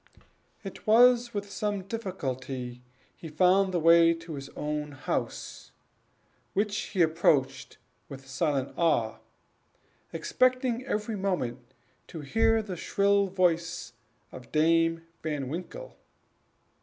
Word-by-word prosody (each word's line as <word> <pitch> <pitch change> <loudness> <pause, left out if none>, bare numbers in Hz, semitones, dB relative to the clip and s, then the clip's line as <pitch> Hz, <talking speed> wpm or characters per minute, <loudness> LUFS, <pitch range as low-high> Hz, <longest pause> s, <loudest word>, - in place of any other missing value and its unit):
It 195 +1 -9
was 240 +2 +5
with 205 -2 -5
some 205 -2 -2
difficulty 135 - -5
that - - -24 0.3
he 165 - -10
found 185 +5 +3
the 175 - 0
way 165 +1 +6
to 165 0 -9
his 140 -1 -7
own 150 0 -3
house, 135 - -5 0.8
which 205 +1 0
he 190 -5 0
approached 145 -5 +1 0.3
with 135 0 -10
silent 140 -1 -1
awe, 115 -10 +1 0.9
expecting 255 +7 +1
every 210 +1 -2
moment 130 -11 -3 0.3
to 165 - -8
hear 225 +8 +2
the 195 -3 -6
shrill 200 +3 +2
voice 175 -3 0 0.4
of 125 -2 -12
Dame 165 +1 +2 0.2
Van 145 -4 -3
Winkle. 180 - -7
170 Hz, 115 wpm, -28 LUFS, 145-200 Hz, 0.9 s, way